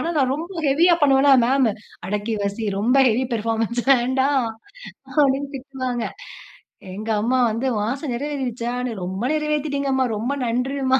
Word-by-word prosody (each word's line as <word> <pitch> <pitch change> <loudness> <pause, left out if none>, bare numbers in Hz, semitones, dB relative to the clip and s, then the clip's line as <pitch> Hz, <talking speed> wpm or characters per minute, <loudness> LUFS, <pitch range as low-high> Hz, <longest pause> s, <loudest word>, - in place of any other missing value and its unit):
ஆனா 335 - -1
நான் 265 -3 +2
ரொம்ப 330 +5 -6 0.2
ஹெவியா 330 +6 +4
பண்ணுவேனா, 275 0 +5
மேம், 260 0 +3 0.4
அடக்கி 210 +3 -2
வாசி, 200 +3 -3
ரொம்ப 235 +5 +2
ஹெவி 240 +3 +1
பெர்ஃபார்மன்ஸ் 225 +1 -1
வேண்டாம். 260 0 +2 0.7
அப்படின்னு 280 -1 +3
திட்டுவாங்க. 255 -3 -4 0.9
எங்க 215 +3 -6
அம்மா 245 +4 +1
வந்து 230 +5 -2
உன் 210 0 -1
ஆச 270 +2 -4
நிறைவேறிரிச்சான்னு? 250 -2 -3
ரொம்ப 190 +2 -4
நிறைவேத்திட்டீங்க 300 -2 -1
அம்மா 265 0 +2
ரொம்ப 240 +6 -2
நன்றிம்மா 260 +2 +1
260 Hz, 135 wpm, -22 LUFS, 230-275 Hz, 0.9 s, பண்ணுவேனா